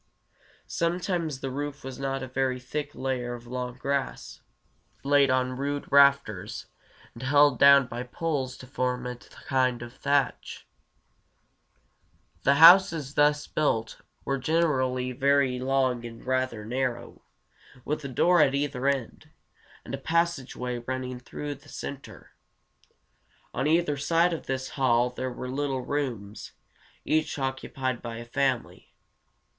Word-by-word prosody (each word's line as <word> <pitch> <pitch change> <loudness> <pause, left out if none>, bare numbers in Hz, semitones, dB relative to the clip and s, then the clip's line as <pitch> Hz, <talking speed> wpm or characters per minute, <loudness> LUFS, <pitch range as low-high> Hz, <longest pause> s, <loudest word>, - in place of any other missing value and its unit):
Sometimes 170 -4 -2
the 135 - -3
roof 145 +1 -5
was 130 0 -7
a 135 -1 -3
very 130 -1 0
thick 145 +3 -5
layer 125 -2 -2
of 120 0 -12
long 125 0 -5
grass, 140 0 -3 0.6
laid 140 0 +4
on 130 0 +1
rude 140 +2 -3
rafters, 140 -8 +3 0.5
and 115 - -11
held 145 0 +4
down 140 -1 +7
by 120 0 -6
poles 130 -1 -3
to - - -11
form 125 -1 -2
a 125 -1 -5
kind 125 -1 -2
of 120 0 -10
thatch. 140 -1 -1 1.7
[Illustration: 85 - -35
A - - +6
Long 140 - +5
House.] 175 +5 +9
The - - -7
houses 145 -3 -6
thus 150 0 +3
built 115 -7 -1 0.2
were 135 0 -1
generally 130 -4 +1
very 135 -1 +2
long 130 -2 0
and 115 -1 -10
rather 130 -4 -1
narrow, 125 0 -3 0.6
with 150 +1 -2
a - - -4
door 170 +7 +3
at 135 -2 +3
either 140 -2 -1
end, 135 -4 -2 0.6
and - - -8
a - - -3
passageway 135 -7 -1
running 125 +1 -4
through 145 +4 -6
the 140 - -16
center. 140 -1 -8 1.2
On 135 - -1
either 160 -2 +2
side 170 +4 +2
of 165 - -6
this 130 0 -3
hall 125 -2 +2
there 130 +1 -4
were 125 +1 -6
little 135 0 -2
rooms, 120 -8 -4 0.5
each 155 -1 0
occupied 130 -1 -3
by 115 -1 -6
a 120 - -8
family. 130 0 -2
135 Hz, 140 wpm, -27 LUFS, 125-145 Hz, 1.7 s, House